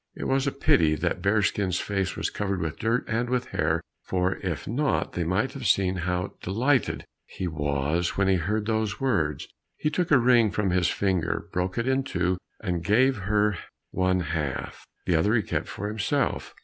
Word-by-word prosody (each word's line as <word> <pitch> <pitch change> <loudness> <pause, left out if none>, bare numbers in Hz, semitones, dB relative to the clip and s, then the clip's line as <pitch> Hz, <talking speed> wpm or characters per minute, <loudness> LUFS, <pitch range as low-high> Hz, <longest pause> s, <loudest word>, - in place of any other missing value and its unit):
It - - -6
was 135 +1 +1
a - - +2
pity 80 - +3
that 90 - -2
Bearskin's 100 -2 +1
face 95 -2 -1
was - - -2
covered 100 -2 -2
with 80 -3 -3
dirt 115 +3 +1
and 120 +2 -1
with 125 0 -1
hair, 80 +2 0 0.2
for 90 0 0
if - - -4
not 135 +6 0
they 90 - -1
might 100 +10 0
have 135 -5 -4
seen 95 -1 +3
how 90 +2 -2
delighted 125 +8 +1 0.2
he 95 - -4
was 75 +2 -1
when 100 0 +2
he 95 -1 +4
heard 105 +5 -1
these 110 -1 -1
words. 80 - 0 0.3
He 150 - 0
took 180 +2 0
a 145 - +6
ring 120 -2 +5
from 100 -2 0
his 90 -1 +2
finger, 95 -4 0
broke 90 +1 -1
it 115 +1 0
in 130 0 +2
two, 90 -6 -1 0.2
and 90 -5 -2
gave 125 +8 +3
her 105 0 +1 0.3
one 95 0 +1
half, 80 -6 -4 0.2
the 90 - +2
other 100 +8 +3
he 110 - +2
kept - - -2
for 105 - -5
himself. 110 +5 -1
100 Hz, 190 wpm, -26 LUFS, 90-115 Hz, 0.3 s, a